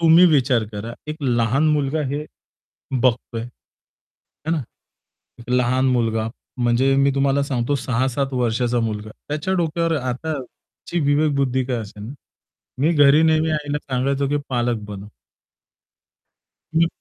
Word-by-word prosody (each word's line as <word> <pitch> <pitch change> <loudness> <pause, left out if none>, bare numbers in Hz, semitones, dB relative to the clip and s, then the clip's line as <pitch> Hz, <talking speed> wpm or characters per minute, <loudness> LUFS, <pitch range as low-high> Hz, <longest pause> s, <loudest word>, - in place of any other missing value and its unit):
तुम्ही 165 +2 +7
विचार 130 -7 +3
करा, 110 +3 -6
एक 155 - -3
लहान 125 +3 +2
मुलगा 150 0 +1
हे 145 +3 -3 0.8
बघतोय. 120 -2 0 1.0
है - - 0
ना. 160 -4 0 0.9
लहान 125 +1 +2
मुलगा. 115 -3 +1 0.3
म्हणजे 125 +3 +3
मी 140 0 +4
तुम्हाला 140 0 +2
सांगतो 135 0 -1
6-7 130 +2 -1
वर्षाचा 120 0 +1
मुलगा. 110 -1 -3 0.2
त्याच्या 155 +6 -1
डोक्यावर 165 -1 0
आताची 140 +5 -5
विवेकबुद्धी 140 -3 +2
काय 125 -1 -2
असेल, 110 +1 -7 0.7
मी 160 +4 +3
घरी 145 0 +6
नेहमी 160 0 +3
आईला 150 -1 -1
सांगायचो 135 +2 0
की 145 - +1
पालक 120 -2 0
बनव. 100 0 -7 1.7
हं. 165 +1 +4
135 Hz, 120 wpm, -21 LUFS, 120-150 Hz, 1.7 s, तुम्ही